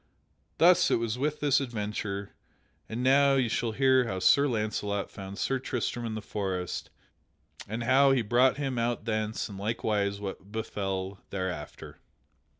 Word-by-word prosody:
Thus 180 Hz, +1 st, +5 dB
it -, -, +3 dB
was 115 Hz, +1 st, -2 dB
with 150 Hz, +2 st, -1 dB
this 145 Hz, -1 st, +3 dB
adventure. 105 Hz, -4 st, -4 dB, 0.6 s
And 115 Hz, +3 st, -3 dB
now 135 Hz, +1 st, +5 dB
you 130 Hz, -3 st, +2 dB
shall 115 Hz, 0 st, -1 dB
hear 130 Hz, +1 st, +4 dB
how 95 Hz, -, -3 dB
Sir 140 Hz, +9 st, +4 dB
Launcelot 105 Hz, -4 st, -2 dB
found 95 Hz, 0 st, -8 dB
Sir 135 Hz, +3 st, 0 dB
Tristram 120 Hz, -2 st, -3 dB
in 110 Hz, -, -4 dB
the 110 Hz, -, -5 dB
forest 95 Hz, -3 st, -3 dB, 0.8 s
and 115 Hz, +3 st, -4 dB
how 135 Hz, +3 st, +5 dB
he 130 Hz, -3 st, +2 dB
brought 125 Hz, +5 st, +3 dB
him 135 Hz, -4 st, -2 dB
out 115 Hz, -2 st, -1 dB
thence 110 Hz, -1 st, -2 dB
and 100 Hz, -2 st, -9 dB
likewise 105 Hz, -1 st, -1 dB
what 100 Hz, 0 st, -7 dB
befell 95 Hz, -3 st, -3 dB
thereafter. 95 Hz, -2 st, -5 dB
110 Hz, 150 wpm, -29 LUFS, 100-130 Hz, 0.8 s, Thus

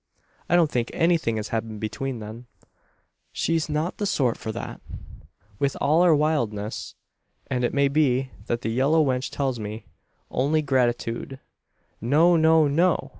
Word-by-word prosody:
"I 175 Hz, -, +4 dB
don't 165 Hz, -4 st, +4 dB
think 120 Hz, -1 st, -1 dB
anything 165 Hz, -9 st, +2 dB
has 105 Hz, 0 st, -4 dB
happened 110 Hz, -1 st, -3 dB
between 120 Hz, +5 st, -4 dB
them. 110 Hz, +3 st, -9 dB, 0.8 s
She's 165 Hz, -1 st, -1 dB
not 155 Hz, +4 st, -2 dB
the 205 Hz, -, 0 dB
sort 130 Hz, -10 st, +1 dB
for 110 Hz, -, -5 dB
that, -, -, -7 dB, 0.8 s
with 140 Hz, -1 st, 0 dB
all 155 Hz, +4 st, +3 dB
her 175 Hz, -3 st, +5 dB
wildness; 120 Hz, -9 st, -1 dB, 0.6 s
and 125 Hz, -1 st, 0 dB
it 120 Hz, -, +1 dB
may 140 Hz, 0 st, +2 dB
be 135 Hz, -3 st, +1 dB, 0.2 s
what 120 Hz, 0 st, -1 dB
that -, -, -3 dB
yellow 140 Hz, +7 st, +3 dB
wench 130 Hz, -1 st, -1 dB
tells 135 Hz, -4 st, -2 dB
me 105 Hz, +1 st, -6 dB, 0.5 s
only 150 Hz, +4 st, +1 dB
gratitude. 125 Hz, -1 st, -1 dB, 0.6 s
No, 155 Hz, +9 st, +4 dB
no, 160 Hz, -1 st, +5 dB
no! 170 Hz, +5 st, +1 dB
135 Hz, 150 wpm, -24 LUFS, 115-155 Hz, 0.8 s, her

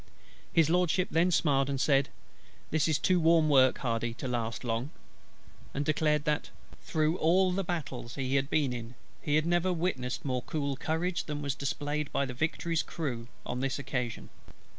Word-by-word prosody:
His 165 Hz, -3 st, +4 dB
LORDSHIP 180 Hz, +1 st, +2 dB
then 165 Hz, +3 st, +3 dB
smiled, 140 Hz, -5 st, +2 dB
and 135 Hz, -1 st, -1 dB
said: 140 Hz, -1 st, +3 dB, 0.6 s
"This 160 Hz, 0 st, +2 dB
is 155 Hz, -3 st, +2 dB
too 185 Hz, -1 st, +2 dB
warm 165 Hz, -1 st, +4 dB
work, 130 Hz, -2 st, +5 dB
HARDY, 115 Hz, -2 st, -2 dB
to 125 Hz, -, -5 dB
last 120 Hz, -1 st, -2 dB
long;" 120 Hz, +3 st, -2 dB, 0.9 s
and 145 Hz, +1 st, -1 dB
declared 150 Hz, 0 st, +1 dB
that 150 Hz, -1 st, 0 dB, 0.3 s
"through 155 Hz, +1 st, 0 dB
all 185 Hz, +3 st, +4 dB
the 195 Hz, +2 st, -1 dB
battles 160 Hz, -9 st, -4 dB
he 135 Hz, -1 st, -1 dB
had 135 Hz, 0 st, +1 dB
been 145 Hz, -6 st, +1 dB
in, 120 Hz, 0 st, -7 dB, 0.3 s
he 145 Hz, -, 0 dB
had 155 Hz, +1 st, +3 dB
never 175 Hz, +2 st, +2 dB
witnessed 160 Hz, -9 st, -2 dB
more 130 Hz, -2 st, -1 dB
cool 140 Hz, -1 st, -2 dB
courage 165 Hz, +5 st, -1 dB
than 150 Hz, -1 st, -4 dB
was 140 Hz, -2 st, -1 dB
displayed 145 Hz, +1 st, -3 dB
by 140 Hz, -, +1 dB
the 130 Hz, -, -5 dB
Victory's 160 Hz, +4 st, 0 dB
crew 125 Hz, -8 st, -4 dB, 0.2 s
on 125 Hz, -, -3 dB
this 135 Hz, 0 st, -1 dB
occasion." 125 Hz, -4 st, -4 dB
145 Hz, 175 wpm, -30 LUFS, 130-160 Hz, 0.9 s, work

